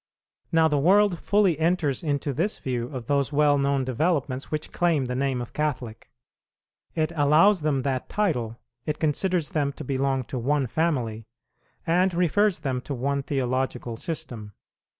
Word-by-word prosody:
Now 160 -1 +4
the 150 -2 +1
world 190 +3 +4
fully 200 -6 +2
enters 160 -5 +1
into 145 -2 -1
this 175 - -1
view 125 -3 -3
of 125 -3 -7
those 140 +1 0
well 145 -1 +3
known 140 -1 +1
developments 135 0 -1
which 155 0 -4
claim 165 -6 +1
the 125 - -3
name 130 -1 -1
of 120 - -12
Catholic. 125 -7 -3 0.9
It 155 0 0
allows 160 +6 +4
them 145 -4 0
that 130 -2 -2
title, 125 - -1 0.3
it 150 0 -1
considers 165 +2 0
them 145 -5 0
to - - -8
belong 135 0 0
to 125 +1 -5
one 140 +3 +1
family, 120 -6 -1 0.6
and 180 +2 +2
refers 185 +3 +2
them 130 -3 -2
to 140 - -5
one 140 +3 -1
theological 130 -3 -2
system. 120 -8 -6
145 Hz, 155 wpm, -25 LUFS, 130-165 Hz, 0.9 s, Now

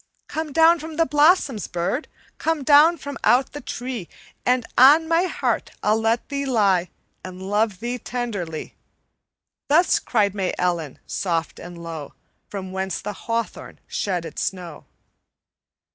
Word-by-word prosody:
"'Come 315 -1 -4
down 325 +3 +5
from 320 +1 -7
out - - -10
the 330 - +4
blossoms, 295 - +3
bird! 175 - -2 0.3
Come 320 -3 0
down 300 +5 +6
from 285 -2 -7
out 245 +5 +3
the 290 - -7
tree, 245 -7 -5 0.4
And 250 -1 +2
on 295 +6 +7
my 335 +2 +3
heart 365 - -1
I'll 215 +1 +3
let 225 +1 +1
thee 280 0 -2
lie, 195 -8 +2 0.3
And 185 0 -8
love 205 +1 -1
thee 245 +1 -3
tenderly!' 205 -11 -4 1.0
Thus 330 +5 +4
cried 205 -5 +1
May 195 -3 -2
Ellen, 170 -5 -1
soft 165 -3 -2
and 175 0 -9
low, 160 -4 -7 0.3
From 190 -2 -6
where 190 0 -2
the 205 +2 -4
hawthorn 230 +3 -4
shed 180 -4 -2
its 155 - -6
snow. 180 -4 -5
225 Hz, 145 wpm, -23 LUFS, 185-285 Hz, 1.0 s, on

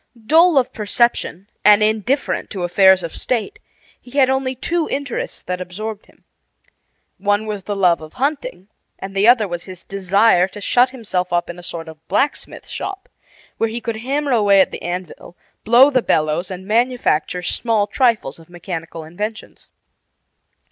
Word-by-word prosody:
Dull 325 +4 +5
of 260 -1 +2
perception 210 -3 0 0.2
and 210 0 +6
indifferent 220 +6 0
to 190 -4 -5
affairs 190 +1 +5
of 165 - -6
state, 230 -5 -3 0.4
he 255 +3 -10
had 265 -2 +5
only 265 -1 -1
two 335 +5 -1
interests 280 -2 -4
that 180 0 -4
absorbed 210 +4 -6
him. - - -25 1.0
One 205 +2 +1
was 210 -2 -4
the 205 - -3
love 180 -4 +3
of 155 0 -11
hunting, 260 -9 -3 0.3
and 195 0 -8
the 200 +3 +3
other 235 -4 +5
was 175 -1 -5
his 185 -2 -11
desire 195 0 +2
to 205 - -11
shut 245 +5 +3
himself 200 -8 -3
up 175 0 0
in 175 - -12
a - - -10
sort 170 -2 -7
of 160 0 -13
blacksmith 270 +10 -2
shop, 390 0 -6 0.5
where 225 - +1
he 230 +2 -4
could 230 -1 -4
hammer 275 +5 -2
away 205 -4 +4
at 190 - +3
the - - -7
anvil, 175 0 -6 0.3
blow 245 +6 +6
the 255 -2 +2
bellows, 155 -1 0
and 185 0 -7
manufacture 220 -6 0
small 220 +2 0
trifles 215 - 0
of 165 +1 -17
mechanical 170 -2 -7
inventions. 210 +7 -7
205 Hz, 165 wpm, -19 LUFS, 180-245 Hz, 1.0 s, and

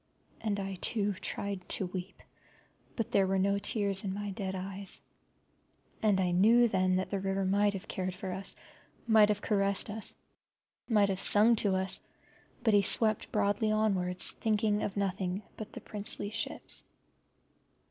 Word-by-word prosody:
And 210 -2 -2
I, 195 -1 -5
too, 205 -3 0
tried 195 0 -5
to 190 - +1
weep, 180 +1 -7 0.7
but 230 - -3
there 195 -1 +3
were 195 0 0
no 200 +1 +1
tears 200 -1 +1
in 195 -1 -3
my 205 0 -4
dead 190 0 -4
eyes. 195 +1 -3 1.0
And 210 -3 +2
I 180 -1 +1
knew 225 +7 +5
then 185 -3 +1
that 185 0 -2
the 200 - -1
river 195 0 -1
might 205 +2 +2
have 195 +2 -7
cared 185 -1 -4
for 190 0 -6
us, 190 +2 -3 0.5
might 220 -2 +5
have 210 -1 -1
caressed 200 0 +1
us, 220 0 -2 0.7
might 210 -3 +3
have 190 -1 -1
sung 215 +4 +6
to 200 -3 +2
us, 190 0 +2 0.6
but 220 - +3
he 205 - +6
swept 215 +2 +3
broadly 210 +1 +1
onwards, 190 -4 +2
thinking 210 -1 0
of 200 - -4
nothing 190 0 -2
but 215 - -8
the - - -8
princely 205 0 -2
ships. - - -2
200 Hz, 160 wpm, -30 LUFS, 190-210 Hz, 1.0 s, sung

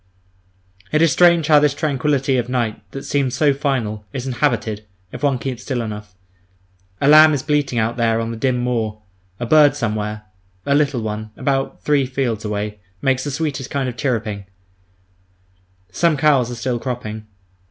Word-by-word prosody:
It 155 - +2
is 165 - +4
strange 170 -2 +5
how 150 -1 +6
this 145 -1 +2
tranquillity 140 -2 0
of 120 0 -2
night, 120 -4 -1
that 135 - -7
seems 135 -3 0
so 145 +1 +3
final, 130 -7 -2
is 125 - -4
inhabited, 120 -5 -1 0.3
if - - -8
one 140 -3 +2
keeps 125 -1 -5
still 130 -1 -3
enough. 105 -4 -6 0.8
A 140 - +1
lamb 155 +1 +8
is 135 - -3
bleating 145 -5 0
out 115 +1 0
there 115 -1 +2
on 115 0 -3
the - - -5
dim 125 +2 0
moor; 115 -3 -2 0.4
a 120 - -2
bird 145 +2 +5
somewhere, 105 -4 -3 0.4
a 140 - +2
little 140 -5 +1
one, 110 0 -4
about 135 -1 -2
three 145 -3 +2
fields 125 -4 -2
away, 105 0 -3 0.2
makes 130 +2 +1
the 145 - -3
sweetest 140 -2 -3
kind 140 -2 -1
of 125 - -4
chirruping; 110 -6 -2 1.4
some 165 - +2
cows 135 -4 +3
are 120 - -5
still 120 +1 -2
cropping. 110 -4 -5
125 Hz, 170 wpm, -20 LUFS, 115-145 Hz, 1.4 s, lamb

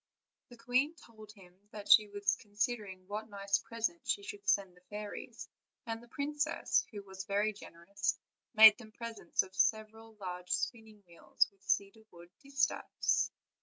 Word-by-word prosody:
The 240 - -13
queen 255 +7 +1
told 220 -7 -14
him 190 -4 -17 0.2
that 210 -1 -9
she 215 -1 +8
was 205 0 0
considering 205 -3 -3
what 215 +2 -5
nice 200 -1 0
present 230 +9 -3
she 405 - 0
should 410 -1 -5
send 195 -3 +2
the 180 - -21
fairies; 210 0 -7 0.4
and 225 -1 -4
the 240 - -16
princess, 295 +4 0
who 205 -3 -8
was 190 -1 -8
very 205 +2 +1
generous, 195 0 -4 0.4
made 220 0 +10
them 220 -3 -12
presents 230 -7 -2
of 190 - -14
several 220 +2 0
German 180 -3 -7
spinning 220 +1 -3
wheels, 170 -1 0
with 195 -1 -34
cedarwood 200 -4 -2
distaffs. 275 0 0
215 Hz, 150 wpm, -33 LUFS, 200-230 Hz, 0.4 s, made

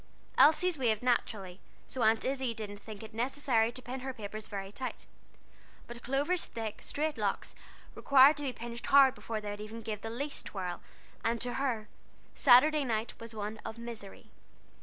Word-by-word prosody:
Elsie's 320 +1 +5
waved 225 -3 +1
naturally, 205 -6 0 0.3
so 260 - -5
Aunt 220 0 +3
Izzie 260 -3 -1
didn't 210 -2 -6
think 215 0 -10
it 220 - -10
necessary 240 -1 +1
to 255 +1 -7
pin 255 +2 -5
her 265 0 -5
papers 215 0 -6
very 195 -1 -5
tight; 255 +5 -5 0.8
but 240 0 -9
Clover's 290 +7 0
thick, 220 -2 -5
straight 305 +1 -2
locks - - -1 0.4
required 280 +2 +6
to 290 - -3
be 270 - -1
pinched 235 0 -7
hard 275 -2 +7
before 225 -4 -4
they 210 -1 -5
would 205 - -6
give 215 +1 -8
even - - -29
the 225 - -5
least 280 +6 -4
twirl, 180 -3 -4 0.4
and 230 0 +1
to 245 -1 0
her, 240 -6 -1 0.5
Saturday 290 +4 +6
night 225 -3 -1
was 230 -1 -9
one 210 +1 -4
of 220 - -6
misery. 230 -4 -9
235 Hz, 175 wpm, -31 LUFS, 215-265 Hz, 0.8 s, hard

